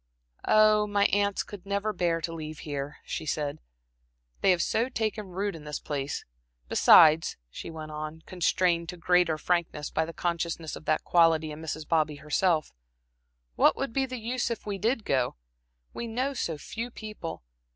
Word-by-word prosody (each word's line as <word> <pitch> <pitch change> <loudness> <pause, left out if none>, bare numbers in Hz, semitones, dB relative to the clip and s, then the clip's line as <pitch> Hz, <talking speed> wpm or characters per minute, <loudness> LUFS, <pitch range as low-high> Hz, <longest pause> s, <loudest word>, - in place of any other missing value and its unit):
"Oh, 215 -1 +5
my 205 -1 +2
aunts 200 0 +2
could 200 -3 -10
never 200 +2 -1
bear 170 -3 0
to 165 +1 -3
leave 155 -1 -7
here," 145 -1 -5
she 155 - -4
said. 145 -2 -2 0.8
"They - - +4
have 180 -2 +4
so 235 +3 +1
taken 215 -4 -2
root 195 +2 -3
in 155 - -10
this 150 -1 -4
place. 140 -1 -4 0.4
Besides," 155 - +6
she - - -7
went 155 -1 -7
on, 155 +1 -6
constrained 175 -2 +1
to 180 - -6
greater 175 -2 +3
frankness 170 -3 -1
by 160 - +1
the 165 - -6
consciousness 170 -2 -2
of - - -11
that 155 - +1
quality 165 -2 +3
in 150 +1 -8
Mrs. 155 -1 -5
Bobby 155 -2 +2
herself 155 +2 +1 0.8
"what - - +4
would 270 -4 -3
be 270 -1 +1
the 255 0 -5
use 240 +2 -1
if 235 - -4
we 200 -2 -3
did 225 +2 0
go? 130 -2 +1 0.6
We 235 - -4
know 255 +5 -1
so 165 - -2
few 230 +10 -5
people. 215 - -7
170 Hz, 170 wpm, -28 LUFS, 155-210 Hz, 0.8 s, Besides